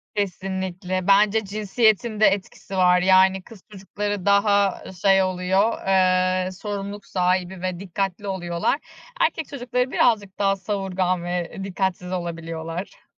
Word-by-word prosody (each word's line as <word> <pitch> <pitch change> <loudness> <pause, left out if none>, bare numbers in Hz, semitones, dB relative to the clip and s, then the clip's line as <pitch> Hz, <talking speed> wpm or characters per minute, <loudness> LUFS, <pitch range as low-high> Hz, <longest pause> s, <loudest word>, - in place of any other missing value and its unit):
Kesinlikle. 185 -1 -3
Bence 205 +2 +4
cinsiyetin 215 +2 +1
de 215 - +6
etkisi 195 0 -3
var. 180 -1 +4
Yani 190 0 +4
kız 220 -3 -15
çocukları 205 0 -4
daha, 200 -1 +3
ııı, - - -10
şey 195 +1 +3
oluyor, 185 +4 0
eee, 185 -1 +2
sorumluluk 200 +1 -6
sahibi 180 0 -1
ve 185 -1 -3
dikkatli 195 +1 -3
oluyorlar. 175 - -1 0.4
Erkek 330 - +1
çocukları 250 -1 -2
birazcık 205 -5 +1
daha 195 -1 +2
savurgan 190 -2 -2
ve 175 -1 -3
dikkatsiz 190 -2 -2
olabiliyorlar. 165 0 -5
190 Hz, 125 wpm, -23 LUFS, 185-205 Hz, 0.4 s, de